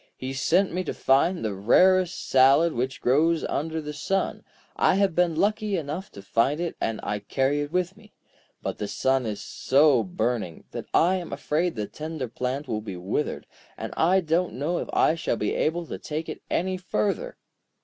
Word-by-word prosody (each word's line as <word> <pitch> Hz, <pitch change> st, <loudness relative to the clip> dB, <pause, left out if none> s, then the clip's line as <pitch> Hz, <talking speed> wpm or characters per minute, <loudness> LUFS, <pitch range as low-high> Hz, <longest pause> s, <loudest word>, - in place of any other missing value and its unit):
He 130 Hz, +1 st, -5 dB
sent 175 Hz, +7 st, +2 dB
me 185 Hz, +1 st, -1 dB
to -, -, -3 dB
find 140 Hz, +3 st, +2 dB
the 105 Hz, -, -1 dB
rarest 185 Hz, -, +3 dB
salad 135 Hz, +5 st, +5 dB
which 130 Hz, +3 st, -3 dB
grows 160 Hz, +6 st, +3 dB
under 160 Hz, +2 st, -2 dB
the 150 Hz, -1 st, -6 dB
sun. 195 Hz, +6 st, -1 dB, 0.3 s
I -, -, +3 dB
have 195 Hz, -2 st, +2 dB
been 175 Hz, -1 st, +2 dB
lucky 210 Hz, +2 st, +1 dB
enough 160 Hz, +4 st, -5 dB
to 100 Hz, -, -10 dB
find 125 Hz, +9 st, +1 dB
it, 175 Hz, -1 st, -2 dB
and 115 Hz, -1 st, -1 dB
I 105 Hz, 0 st, -2 dB
carry 135 Hz, +7 st, 0 dB
it 145 Hz, 0 st, -4 dB
with 180 Hz, +1 st, -1 dB
me. 215 Hz, 0 st, -18 dB, 0.5 s
But -, -, -4 dB
the 105 Hz, -, -2 dB
sun 125 Hz, +5 st, +1 dB
is 105 Hz, -1 st, -4 dB
so 140 Hz, -2 st, +3 dB
burning, 110 Hz, -2 st, -2 dB
that -, -, -6 dB
I 185 Hz, +3 st, +4 dB
am 175 Hz, -2 st, -6 dB
afraid 165 Hz, +3 st, -1 dB
the 105 Hz, -2 st, -2 dB
tender 150 Hz, +5 st, -5 dB
plant 130 Hz, +5 st, -3 dB
will 110 Hz, -, -2 dB
be 100 Hz, -4 st, -6 dB
withered, 95 Hz, +11 st, -2 dB, 0.3 s
and -, -, -5 dB
I 185 Hz, +4 st, +3 dB
don't 170 Hz, +2 st, 0 dB
know 155 Hz, +7 st, -1 dB
if -, -, -5 dB
I -, -, +3 dB
shall 165 Hz, -7 st, -2 dB
be 105 Hz, -, -1 dB
able 170 Hz, +2 st, 0 dB
to -, -, -6 dB
take 155 Hz, +2 st, -4 dB
it -, -, -6 dB
any 185 Hz, +1 st, 0 dB
further.' 210 Hz, -, -2 dB
150 Hz, 190 wpm, -26 LUFS, 125-180 Hz, 0.5 s, salad